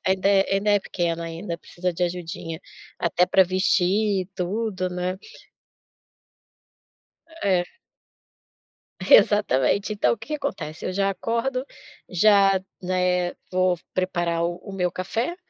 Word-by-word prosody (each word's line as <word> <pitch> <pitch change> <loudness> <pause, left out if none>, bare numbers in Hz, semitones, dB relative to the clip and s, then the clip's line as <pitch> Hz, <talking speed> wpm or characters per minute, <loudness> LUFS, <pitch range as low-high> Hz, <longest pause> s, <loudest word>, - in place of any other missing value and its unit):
ainda 190 +1 +2
é 195 0 +3
ainda 205 +2 +1
é 205 -1 +4
pequena, 170 -3 -2
ainda, 170 +1 -5
precisa 180 +2 -4
de 180 - -4
ajudinha 170 -2 -5 0.4
até 175 +1 +2
pra 190 - +5
vestir 185 +1 +2
tudo, 190 0 -2
né? 180 +1 -3 2.2
É. 185 -3 +2 1.4
Exatamente, 205 - +4
então 210 - +2
o - - -2
que - - -12
que 305 - -2
acontece? 275 - -5
Eu 185 - -2
já 195 +1 +1
acordo, 235 +6 -2 0.4
já, 195 0 +4 0.2
né, 180 -1 0 0.2
vou 185 -1 +2 0.2
preparar 175 -2 -1
o 175 0 -2
o 200 - -9
meu 180 -2 0
café, 225 - -3
185 Hz, 125 wpm, -24 LUFS, 175-200 Hz, 2.2 s, pra